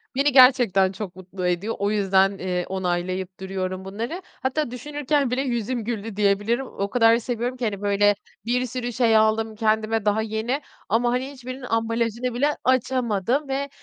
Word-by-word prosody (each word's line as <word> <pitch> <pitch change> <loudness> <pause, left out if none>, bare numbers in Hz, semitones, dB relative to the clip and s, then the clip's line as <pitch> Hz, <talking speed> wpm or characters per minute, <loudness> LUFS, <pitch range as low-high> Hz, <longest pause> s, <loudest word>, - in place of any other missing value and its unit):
beni 280 +1 +3
gerçekten 245 -8 +6
çok 195 -3 -7
mutlu 185 0 -5
ediyor. 180 +6 -1
O 200 +1 +1
yüzden, 195 -1 +3
eee, 180 -1 -2
onaylayıp 185 0 -2
duruyorum 190 0 -4
bunları. 230 - -5
Hatta 260 0 -3
düşünürken 290 0 -1
bile 255 +2 +1
yüzüm 240 -2 -2
güldü 225 -2 -4
diyebilirim, 205 +5 +1
o 200 -3 -4
kadar 230 0 +5
seviyorum 245 +1 -3
ki 245 - -2
hani, 200 -3 -3
böyle 205 0 +3 0.3
bir 250 +2 +1
sürü 245 0 -4
şey 225 -2 +4
aldım 220 0 +2
kendime, 220 0 0
daha 210 +1 +2
yeni. 220 +6 -2 0.3
Ama 240 +3 +2
hani, 255 +3 -2
hiçbirinin 255 -1 -8
ambalajını 230 +2 -1
bile 290 +4 +1
açamadım 255 0 +1
ve, 275 +1 -2
225 Hz, 160 wpm, -24 LUFS, 200-250 Hz, 0.3 s, gerçekten